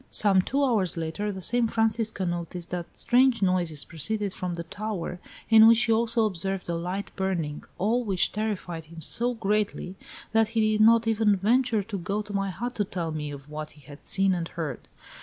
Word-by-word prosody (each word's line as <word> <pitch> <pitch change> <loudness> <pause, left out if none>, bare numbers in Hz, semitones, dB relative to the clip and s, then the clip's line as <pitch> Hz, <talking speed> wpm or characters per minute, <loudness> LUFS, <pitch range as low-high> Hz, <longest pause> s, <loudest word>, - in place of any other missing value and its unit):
Some 195 -3 +4
two 275 +9 0
hours 210 - +1
later 165 +6 -3
the 190 -2 -7
same 240 +2 +2
Francisco 225 -3 0
noticed 175 0 -4
that 175 -1 -5
strange 250 -3 +3
noises 175 -5 +1
proceeded 200 +6 -3
from 180 -1 -4
the 170 - -5
tower, 180 -1 -5 0.3
in 220 0 +8
which 230 +1 +6
he 230 - +1
also 225 0 +2
observed 195 -1 -2
a - - 0
light 180 +4 -4
burning, 175 -6 -2
all 225 +7 +1
which 195 -5 +1
terrified 190 -6 -3
him 165 +1 -12
so 240 +10 0
greatly, 210 -3 -1 0.4
that 225 -1 +3
he 215 -1 +3
did 215 - +1
not 230 +1 +6
even 220 -2 +3
venture 225 +2 +2
to 200 -1 -5
go 200 +4 -2
to 210 0 -9
my 195 0 0
hut 240 +6 -4
to 205 - +2
tell 175 -4 -4
me 150 -1 -4
of 140 -1 -9
what 150 0 -7
he - - -17
had 145 +2 -14
seen 195 0 +4
and 170 -2 -2
heard. 165 -4 -6
195 Hz, 195 wpm, -26 LUFS, 170-220 Hz, 0.4 s, in